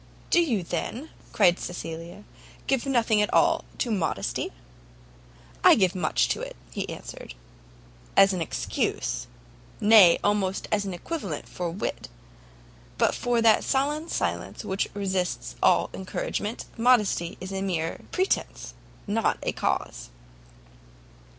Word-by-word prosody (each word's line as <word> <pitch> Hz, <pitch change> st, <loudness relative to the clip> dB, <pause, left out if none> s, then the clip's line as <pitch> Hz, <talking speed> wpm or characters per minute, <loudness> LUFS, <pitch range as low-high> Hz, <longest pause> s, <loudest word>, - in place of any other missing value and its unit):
"Do 345 Hz, -, +6 dB
you, 235 Hz, -, 0 dB
then," 230 Hz, -, -4 dB, 0.2 s
cried 175 Hz, 0 st, +4 dB
Cecilia, 170 Hz, +2 st, -7 dB, 0.4 s
"give 270 Hz, 0 st, 0 dB
nothing 230 Hz, -5 st, +3 dB
at 210 Hz, -, 0 dB
all 335 Hz, -1 st, +3 dB
to 240 Hz, -, -1 dB
modesty?" 160 Hz, -, -1 dB, 1.1 s
"I -, -, +8 dB
give 190 Hz, -3 st, +2 dB
much 180 Hz, -5 st, +1 dB
to -, -, -1 dB
it," -, -, -6 dB, 0.2 s
he -, -, -4 dB
answered, -, -, -8 dB, 0.8 s
"as 195 Hz, 0 st, +7 dB
an 180 Hz, -, -2 dB
excuse, 165 Hz, -, -2 dB, 0.5 s
nay 205 Hz, -5 st, +7 dB
almost 200 Hz, -2 st, 0 dB
as 205 Hz, -1 st, +1 dB
an 190 Hz, -2 st, -4 dB
equivalent 325 Hz, -, -5 dB
for 175 Hz, -1 st, -4 dB
wit; 165 Hz, -, -4 dB, 0.9 s
but -, -, +3 dB
for 240 Hz, -1 st, 0 dB
that 225 Hz, -1 st, +5 dB
sullen 295 Hz, +4 st, 0 dB
silence -, -, -3 dB
which 190 Hz, +1 st, -1 dB
resists 180 Hz, -, -2 dB
all -, -, +3 dB
encouragement, 205 Hz, +3 st, -4 dB
modesty 220 Hz, -8 st, +2 dB
is 185 Hz, +1 st, -7 dB
a 195 Hz, -, -2 dB
mere 165 Hz, -4 st, -2 dB
pretence, 375 Hz, +1 st, -1 dB, 0.3 s
not 220 Hz, +2 st, +1 dB
a -, -, 0 dB
cause." -, -, -2 dB
200 Hz, 125 wpm, -26 LUFS, 180-235 Hz, 1.1 s, I